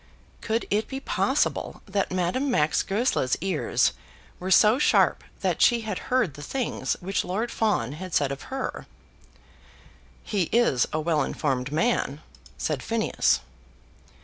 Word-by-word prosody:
Could 225 Hz, +1 st, -1 dB
it 215 Hz, +2 st, +1 dB
be 265 Hz, -, -5 dB
possible -, -, -1 dB
that 195 Hz, -2 st, -1 dB
Madame 185 Hz, +10 st, 0 dB
Max 155 Hz, -11 st, +2 dB
Goesler's 195 Hz, -, 0 dB
ears 185 Hz, -3 st, +1 dB, 0.5 s
were 185 Hz, -, -4 dB
so 215 Hz, +6 st, +6 dB
sharp -, -, +3 dB, 0.2 s
that -, -, 0 dB
she 240 Hz, -2 st, +5 dB
had 220 Hz, -1 st, -4 dB
heard 250 Hz, -, +2 dB
the 145 Hz, -, -10 dB
things 250 Hz, -, -2 dB
which 195 Hz, +3 st, -1 dB
Lord 215 Hz, +6 st, -2 dB
Fawn 205 Hz, -, 0 dB
had 180 Hz, +5 st, -7 dB
said 140 Hz, -1 st, +2 dB
of 140 Hz, -, -5 dB
her? 265 Hz, 0 st, -4 dB, 1.4 s
"He 195 Hz, -6 st, -1 dB
is 230 Hz, -, +3 dB
a 155 Hz, -, -1 dB
well 155 Hz, -1 st, +1 dB
informed 135 Hz, -2 st, -1 dB
man," 155 Hz, -, 0 dB, 0.4 s
said 60 Hz, -, -2 dB
Phineas. -, -, +1 dB
190 Hz, 140 wpm, -26 LUFS, 150-230 Hz, 1.4 s, so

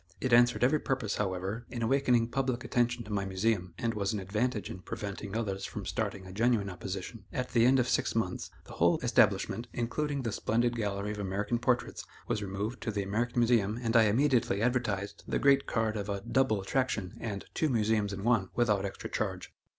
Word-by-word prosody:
It 130 Hz, -2 st, 0 dB
answered 120 Hz, +1 st, +5 dB
every 145 Hz, +5 st, +4 dB
purpose, 130 Hz, -8 st, -1 dB
however, 95 Hz, +4 st, -2 dB
in 120 Hz, -1 st, -4 dB
awakening 125 Hz, -2 st, +3 dB
public 130 Hz, -1 st, -1 dB
attention 120 Hz, 0 st, 0 dB
to 105 Hz, -, -10 dB
my 100 Hz, -1 st, 0 dB
Museum, 95 Hz, -2 st, -1 dB
and 115 Hz, -1 st, -1 dB
was 100 Hz, -1 st, -1 dB
an 105 Hz, -, -1 dB
advantage 105 Hz, +4 st, -1 dB
in 95 Hz, -, -7 dB
preventing 100 Hz, +2 st, -5 dB
others 100 Hz, -4 st, -2 dB
from -, -, -5 dB
starting 95 Hz, -1 st, -3 dB
a 95 Hz, -, -9 dB
genuine 110 Hz, -2 st, +1 dB
opposition. 95 Hz, +4 st, -6 dB
At 125 Hz, 0 st, -3 dB
the 115 Hz, 0 st, +4 dB
end 135 Hz, +1 st, +5 dB
of 125 Hz, -1 st, +2 dB
six -, -, +1 dB
months, 100 Hz, -6 st, -1 dB
the -, -, -12 dB
whole -, -, +3 dB
establishment, 120 Hz, +2 st, +2 dB
including 140 Hz, +4 st, -2 dB
the 115 Hz, -, -1 dB
splendid 120 Hz, +3 st, 0 dB
gallery 105 Hz, -2 st, -2 dB
of 105 Hz, -, -5 dB
American 100 Hz, +4 st, -1 dB
portraits, 125 Hz, 0 st, 0 dB, 0.2 s
was 105 Hz, -, -1 dB
removed 105 Hz, +4 st, -4 dB
to -, -, -3 dB
the 100 Hz, -1 st, -1 dB
American 115 Hz, +5 st, 0 dB
Museum 115 Hz, -3 st, +2 dB
and 115 Hz, -1 st, -1 dB
I 115 Hz, -1 st, +7 dB
immediately 120 Hz, -2 st, +2 dB
advertised 110 Hz, -4 st, -1 dB
the -, -, 0 dB
great 140 Hz, 0 st, +4 dB
card 110 Hz, -1 st, 0 dB
of 105 Hz, -1 st, -4 dB
a 100 Hz, -1 st, -2 dB
"Double 130 Hz, -1 st, +1 dB
attraction" 110 Hz, -2 st, -1 dB
and 100 Hz, -4 st, -4 dB
"Two 155 Hz, -, +1 dB
Museums 110 Hz, -4 st, +1 dB
in 100 Hz, 0 st, -5 dB
One," 115 Hz, -5 st, +2 dB
without 105 Hz, -5 st, +2 dB
extra 100 Hz, -, -5 dB
charge. -, -, -3 dB
110 Hz, 195 wpm, -30 LUFS, 100-120 Hz, 0.2 s, I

